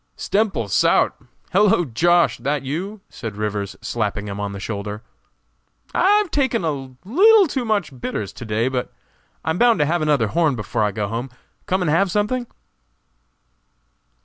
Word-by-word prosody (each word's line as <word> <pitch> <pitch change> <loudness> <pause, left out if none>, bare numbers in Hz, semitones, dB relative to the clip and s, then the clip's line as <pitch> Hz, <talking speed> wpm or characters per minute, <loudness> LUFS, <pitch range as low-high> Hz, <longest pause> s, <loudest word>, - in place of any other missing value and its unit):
"Stemple 200 - 0
sout! 100 - +3 0.4
Hellow, 190 -3 +4
Josh., 170 +7 +2
that 145 0 -1
you?" 185 +10 -4
said 115 -4 -7
Rivers, 105 -1 -3
slapping 105 -2 -2
him 100 0 -5
on 100 -1 -3
the 100 - -7
shoulder. 105 +1 -5 0.9
"I've 410 -2 +3
taken 260 -9 +1
a 135 -4 -4
leetle 400 - +6
too 265 -4 -2
much 195 - -2
bitters 105 -5 -4
to - - -9
day, 110 +2 0
but 130 -1 -2 0.5
I'm 160 +2 -1
bound 240 -3 +5
to 150 - +2
have 170 +3 0
another 145 -8 +2
horn 160 -2 +2
before 110 +1 -3
I 105 - +2
go 105 0 -2
home. 115 +5 -4 0.4
Come 185 0 +1
and 155 - +1
have 185 +5 +3
something?" 215 +6 -1
150 Hz, 155 wpm, -21 LUFS, -, 0.9 s, leetle